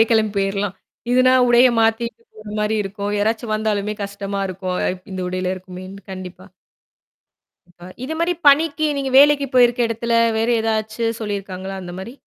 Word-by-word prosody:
அப்டியே 225 - +6
கிளம்பி 220 -2 +2
போயிர்லாம். 195 0 -1 0.4
இதுனா 255 +1 +4 0.2
உடைய 240 +1 +6
மாத்திட்டு 225 - 0
போற 215 -1 -10
மாரி 210 +1 0
இருக்கும் 200 +1 -4
யாராச்சும் 220 +2 -1
வந்தாலுமே 210 -1 -1
கஷ்டமா 200 0 -5
இருக்கும் 185 0 -4
அப் 180 0 -4
இந்த 190 - -4
உடையில 185 0 -2
இருக்குமேன்னு 185 +1 -10
கண்டிப்பா. 185 0 -9 1.2
இப்ப 175 0 -14 0.2
இது 310 +5 -4
மாரி 340 +1 +1 0.2
பணிக்கு 310 +2 +3
நீங்க 270 -1 -2
வேலைக்கு 285 0 +5
போயிருக்க 245 0 +4
இடத்தில 230 +1 -2 0.2
வேற 225 +1 0
ஏதாச்சு 220 0 -2 0.2
சொல்லிருக்காங்களா 195 -2 -5
அந்த 175 -1 -8
மாரி? 230 +6 -8
215 Hz, 150 wpm, -20 LUFS, 195-235 Hz, 1.2 s, அப்டியே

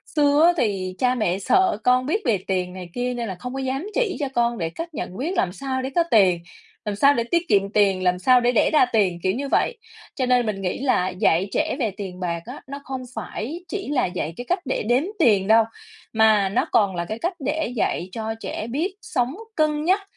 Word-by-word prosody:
xưa 290 +1 +4
á 350 - +6
thì 190 -6 -1
cha 255 0 +2
mẹ 195 -5 0
sợ 375 - +2
con 250 0 +3
biết 415 +9 0
về 225 -6 +3
tiền 180 -1 -1
này 180 -2 -8
kia 245 0 -2
nên 235 -2 -3
là 190 - -4
không 250 +1 -6
có 270 - -4
dám 270 +7 -2
chỉ 475 -6 0
cho 285 - -1
con 235 0 +1
để 165 -4 -2
cách 330 - -7
nhận 185 -6 -5
biết 325 +9 -2
làm 180 - +1
sao 260 +5 -3
để 260 - -3
có 340 - +4
tiền, 190 -5 +5 0.5
làm 210 - -2
sao 280 +8 +5
để 235 - 0
tiết 340 +8 0
kiệm 200 0 +3
tiền, 195 -3 +3
làm 180 0 +2
sao 255 +5 +5
để 240 +1 +3
đẻ 235 - +3
ra 300 - +6
tiền? 185 -6 +2
Kiểu 185 0 +2
như 280 +2 -3
vậy, 480 - +1 0.4
cho 260 - 0
nên 250 -1 +3
mình 205 -3 -3
nghĩ 180 -2 -2
là 255 -9 +1
dạy 185 -1 +1
trẻ - - 0
về 225 -6 0
tiền 190 -3 -6
bạc 170 -2 -3
á, 250 +4 -9
nó 280 +1 -6
không 265 -1 -5
phải 325 +11 -5
chỉ 390 0 -5
là 290 -3 +1
dạy 175 -3 -3
cái 245 - -6
cách 360 - +2
để 260 - -1
đếm 250 +4 +3 0.2
tiền 205 -9 +4
đâu 225 +1 +6 0.5
mà 220 -3 +4
nó 195 - +1
còn 200 -3 +3
là 170 0 -2
cái 220 +5 -5
cách 350 +7 -1
để 295 -1 -2
dạy 190 -4 -1
cho 220 +1 -3
trẻ 220 - -5
biết 320 - -2
sống 250 +4 -1 0.2
cân 305 -1 +1
nhắc 375 +5 +2
240 Hz, 240 wpm, -23 LUFS, 195-280 Hz, 0.5 s, á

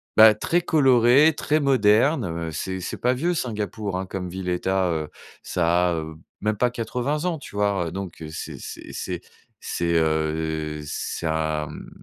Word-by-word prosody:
bah 110 0 +9
très 170 +11 +1
coloré, 135 -2 +5
très 150 +1 +1
moderne, 130 0 +3
heu, 85 -1 -4
c'est 95 +5 -4
c'est - - -4
pas 125 +1 +1
vieux 170 +7 0
Singapour 105 - -3
hein, 95 - -3
comme 90 -1 -5
ville 90 +1 -4
et 90 0 0
tu - - -3
as, 95 -2 +2
heu, 80 -2 -2 0.3
ça 90 +1 +2
a, - - 0
heu, 80 -1 -5 0.2
même 110 +1 +1
pas 125 +4 +3
80 125 +6 -2
ans, 170 -3 -1
tu 120 - -11
vois? 100 -4 +1
Heu, - - -5
donc, 95 -4 -6
c'est 80 - -6
c'est - - -9
c'est - - -4 0.4
c'est, 85 0 -1
heu, 80 -1 0
c'est 80 - -4
un, 80 -1 0
mmh, - - -9
95 Hz, 185 wpm, -24 LUFS, 80-125 Hz, 0.4 s, bah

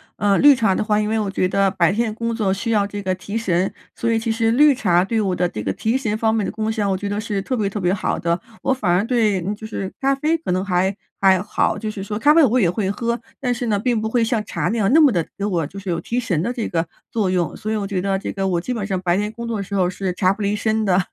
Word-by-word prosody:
呃， 200 -1 +2
绿 290 -1 +7
茶 220 -6 +2
的 - - -1
话， 210 0 +1
因 210 0 0
为 220 0 +1
我 210 -2 -1
觉 195 -1 0
得 195 +1 +2
白 180 -3 +2
天 220 +1 0
工 230 +1 -2
作 210 -4 0
需 230 +4 -3
要 205 -2 +2
这 205 0 -6
个 185 -1 0
提 195 +4 -5
神， 190 -4 0 0.2
所 230 - -2
以 230 - +2
其 225 0 -1
实 225 0 +1
绿 290 +5 +6
茶 180 -9 +2
对 225 +4 -1
我 195 -4 0
的 180 0 +1
这 110 - -5
个 95 -2 -2
提 225 - 0
神 215 -5 -2
方 220 0 +1
面 220 -3 0
的 - - -3
功 220 0 -2
效， 210 -3 -1
我 190 - +1
觉 200 +2 -4
得 205 +1 -2
是 210 -2 -2
特 255 +6 -2
别 205 -3 0
特 205 0 -4
别 180 +1 +2
好 195 - -1
的， 170 +1 0 0.2
我 265 - +1
反 215 -8 -2
而 180 +4 +3
对 220 -6 +1
嗯， 195 +5 -2
就 220 - -8
是 195 -3 -5
咖 275 0 +2
啡 305 +4 +1
可 315 - -3
能 185 +1 0
还 190 0 +1 0.2
还 190 -2 +4
好， 200 - 0
就 215 -1 -4
是 205 - -7
说 210 +2 -4
咖 295 +7 +5
啡 330 - +6
我 250 -2 +3
也 195 -9 +3
会 195 0 -1
喝， 235 +3 -2 0.2
但 250 -2 +1
是 245 +1 -3
呢， 215 -3 +1
并 235 +2 0
不 220 - -1
会 235 0 +2
像 225 -1 0
茶 - - -2
那 230 - -1
样， 200 -3 +2
那 320 - +7
么 290 -4 +6
的 170 -6 -1
给 200 - -4
我 175 -7 0
就 190 - -12
是 195 -1 -6
有 170 -1 0
提 235 - -4
神 190 -10 0
的 235 +8 -1
这 235 -3 -3
个 165 -1 -1 0.2
作 215 -5 0
用。 175 -4 0
所 215 - -5
以 220 - 0
我 205 -2 -2
觉 195 -2 -2
得 195 0 0
这 190 - -4
个 195 -1 -2
我 175 -2 0
基 250 - -3
本 210 -5 -3
上 195 -2 -1
白 175 -1 +1
天 210 +1 -1
工 235 +1 -6
作 230 -1 -2
的 200 - -3
时 200 +1 -5
候 185 -2 +2
是 185 0 -3
茶 185 +1 +2
不 200 - -5
离 205 0 0
身 220 +1 0
的。 185 -3 +3
205 Hz, 340 characters per minute, -21 LUFS, 190-230 Hz, 0.2 s, 绿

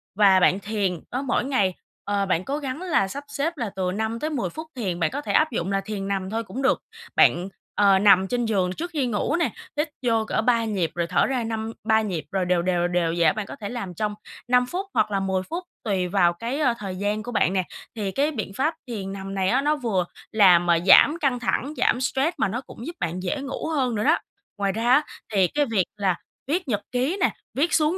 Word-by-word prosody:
và 195 -2 +6
bạn 185 +1 +4
thiền 200 -4 -1
đó, 255 - -1
mỗi 255 -2 0
ngày, 205 -9 +1 0.3
ờ, 200 -1 0
bạn 185 -1 0
cố 280 - -2
gắng 280 +2 -4
là 325 - +1
sắp 285 +9 -6
xếp 285 +4 -2
là 230 -5 -2
từ 185 -1 -1
5 220 +3 -2
tới 310 - -2
10 280 -6 -2
phút 315 +1 -8
thiền, 190 -8 -2
bạn 160 -2 +1
có 285 - -3
thể - - -3
áp 310 -1 +4
dụng 195 -5 -2
là 195 0 +1
thiền 195 -1 -5
nằm 195 -1 -2
thôi 225 +1 -2
cũng 260 +5 -6
được. 265 - +2 0.3
Bạn, 180 +3 +4 0.3
ờ, 195 -2 +5
nằm 190 -2 +6
trên 240 +2 -1
giường 190 -5 +1
trước 345 - -5
khi 280 -4 +1
ngủ 220 +7 0
nè, 340 - +1 0.3
hít 300 +1 0 0.2
vô 225 -2 +2
cỡ 220 - 0
3 230 0 +2
nhịp 190 -7 -1
rồi 170 -1 -1
thở 165 -5 +2
ra 255 -3 -1
năm 225 0 -3 0.2
ba 220 0 +4
nhịp 185 -7 -3
rồi 190 -2 0
đều, 180 -1 +2
đều, 175 -1 +1
đều 175 -2 0
vậy 170 - +3
đó. - - 0
Bạn 215 0 -4
có - - -8
thể 205 -2 -6
làm 215 -7 -5
trong 210 +4 -2 0.3
5 250 0 +4
phút 370 +9 -4
hoặc - - +2
là 195 - +1
10 190 -1 -1
phút 345 +3 -3 0.2
tùy 190 -5 0
vào 175 -2 +3
cái, 235 - -4
ờ, 255 -6 +3
thời 195 -4 -5
gian 205 +2 -1
của 245 - -6
bạn 190 -5 +2
nè. 190 -1 +1 0.3
Thì 205 -4 -2
cái 290 +6 +1
biện 215 -8 -4
pháp 310 +5 +1
thiền 195 -5 -5
nằm 195 0 -6
này 190 0 +1
á, 260 +3 +3
nó 300 +1 +2
vừa 220 -10 0 0.3
làm 180 -5 +6 0.2
giảm 305 - +7
căng 270 -6 +1
thẳng, 270 +4 -1
giảm 250 - +2
stress 270 +6 0
mà - - +2
nó 240 +7 -3
cũng 240 -2 -11
giúp 340 - -5
bạn 175 +2 -3
dễ 285 +7 -2
ngủ 275 +3 -4
hơn 260 -7 0
nữa 210 - -1
đó. - - +4 0.4
Ngoài 200 -1 0
ra 225 +4 0
á, 280 +4 +6 0.3
thì 190 -3 +4
cái 290 +9 +1
việc 215 -8 +1
là 195 -3 +1 0.3
viết 335 +3 -1
nhật 210 -4 0
ký 260 +10 0
nè, - - +4 0.2
viết 310 +6 +1
xuống 315 +3 +3
220 Hz, 250 wpm, -24 LUFS, 190-265 Hz, 0.4 s, giảm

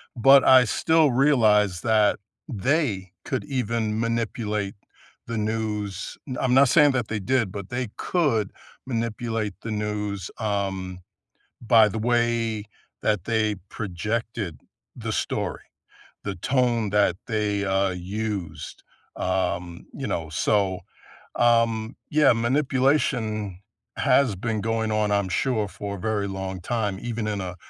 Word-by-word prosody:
but 135 +3 +7
I 130 -1 +7
still 160 +5 +3
realized 110 -9 +3
that 110 -2 +3 0.3
they 115 - 0
could 130 - -2
even 115 -5 -1
manipulate 110 -3 -1 0.5
the 115 -1 -3
news 105 -3 -3
mm, 130 - -4
I'm 130 -2 +2
not 135 0 +6
saying 150 -1 +6
that 125 -4 -1
they 110 - -2
did, 115 -1 0
but 100 -1 -7
they 125 -2 -3
could 135 - 0 0.4
manipulate 115 -3 -2
the 115 - -5
news, 105 -3 -3
um, 95 -4 -2 0.6
by 110 -1 +6
the 110 - -4
way 115 -2 +1 0.4
that 105 -5 0
they 110 -2 +1 0.2
projected 105 - -3 0.4
the - - -4
story. - - -2 0.6
The 100 - -3
tone 120 0 +1
that 105 -4 +3
they, 105 -3 0
uh, 95 0 +1
used, 90 -3 -5 0.3
um, 90 -2 -2
you - - -5
know? 80 -2 -3
So, 95 +2 +1 0.6
um, 115 -1 +2
yeah, 150 -3 +5
manipulation 120 -5 +1 0.4
has 130 -8 +3
been 110 +2 -2
going 115 0 -1
on, 105 -1 +1
I'm 100 -2 +1
sure, 110 +2 0
for 100 0 -6
a - - -10
very 105 0 -1
long 95 -1 -5
time, 105 -2 -1
even 115 -2 -3
in 105 -2 -2
a 90 -1 -6
110 Hz, 130 wpm, -25 LUFS, 100-120 Hz, 0.6 s, but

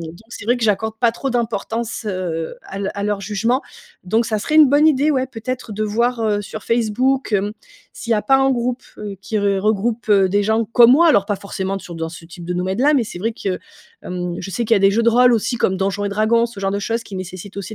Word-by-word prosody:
donc 165 0 -8
c'est 225 - -9
vrai 245 +3 +2
que 240 - -6
j'accorde 220 +1 0
pas 235 -2 +4
trop 270 +4 -4
d'importance, 230 -1 -2
heu, 175 -4 -3
à 195 - -8
leu 195 -1 -2
à 200 - -4
leur 205 -1 -1
jugement. 220 +6 0 0.4
Donc 225 +5 +1
ça 215 -1 -1
serait 300 +9 -3
une 305 -3 +8
bonne 290 +3 +4
idée, 300 0 +3
ouais, 260 -2 +1
peut-être, 245 -1 -6
de 215 - -3
voir, 235 +3 0
heu, 205 -1 0
sur 215 +1 -8
Facebook, 240 +3 0
hem, 205 +1 +1 0.4
s'il 235 - -3
y - - +4
a 210 - 0
pas 270 +6 +4
un 270 0 +3
groupe, 245 +1 -2 0.2
heu, 205 -2 -6
qui 205 +3 -4
regroupe 210 +3 0
des 200 +1 +3
gens 220 +2 +1
comme 235 +2 +6
moi. 335 +4 +5
Alors 205 -9 +4
pas 205 -2 -1
forcément 195 0 -4
sur 175 - -10
dans 165 0 -3
ce 165 0 -11
type 175 0 -11
de 180 - -3
domaine-là. 190 +11 +1
Mais 260 - +3
c'est 175 - -8
vrai 225 +5 -1
que 195 -4 -3 0.5
mmh, 180 -1 -3
je 195 - -6
sais 235 +5 -2
qu'il 230 - +4
y - - +4
a - - +4
des 195 0 +5
jeux 230 +2 +2
de 235 - +4
rôle 245 +1 +5
aussi, 235 +2 0
comme 190 -5 +1
Donjons 195 +2 -1
et - - 0
Dragons, 220 +3 +2
ce 230 -4 -10
genre 195 - 0
de 200 - -1
choses, 230 +3 -2
qui 195 - -9
nécessitent 185 +1 -8
aussi 200 +2 -6
215 Hz, 255 wpm, -19 LUFS, 195-235 Hz, 0.5 s, une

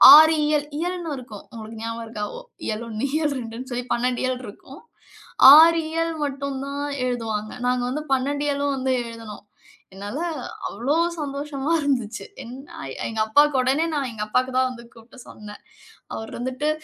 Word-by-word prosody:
ஆறு 315 +1 +8
இயல், 295 -1 +1
இயல்ன்னு 350 -1 -3
இருக்கும். 220 -5 -11
உங்களுக்கு 220 0 -8
ஞாபகம் 230 0 -4
இருக்கா? 210 -2 -4
ஓ - - -6 0.3
இயல் 215 +1 -2
1, 220 +4 -2
இயல் 300 -3 0
2ன்னு 235 +2 -7
சொல்லி 245 0 -3
12 245 +1 0
இயல் 255 -1 -1
இருக்கும். 265 +7 -12 0.7
6 330 +2 +8
இயல் 330 0 0
மட்டும் 280 -1 -3
தான் 280 +1 -4 0.2
எழுதுவாங்க. 225 -4 -2 0.2
நாங்க 250 0 +1
வந்து 290 +4 -2
12 285 +2 0
இயலும் 285 0 0
வந்து 260 0 0
எழுதுனோம். 230 -3 -9 0.5
என்னால 205 +8 -6 0.5
அவ்ளோ 275 +6 -1 0.2
சந்தோஷமா 285 0 -3
இருந்துச்சு. 245 -6 -1 0.8
எங்க 220 -1 -4
அப்பாவுக்கு 290 +3 +4
உடனே 270 +6 +2
நான் 275 -4 -1
எங்க 215 -2 -4
அப்பாவுக்கு 255 +4 +1
தான் 260 0 +3
வந்து 235 -2 -10
கூப்புட்டு 230 +3 -16
சொன்னேன். 210 0 -11 0.5
அவர் 220 - -6
வந்துட்டு 260 +4 -2
255 Hz, 155 wpm, -23 LUFS, 230-285 Hz, 0.8 s, ஆறு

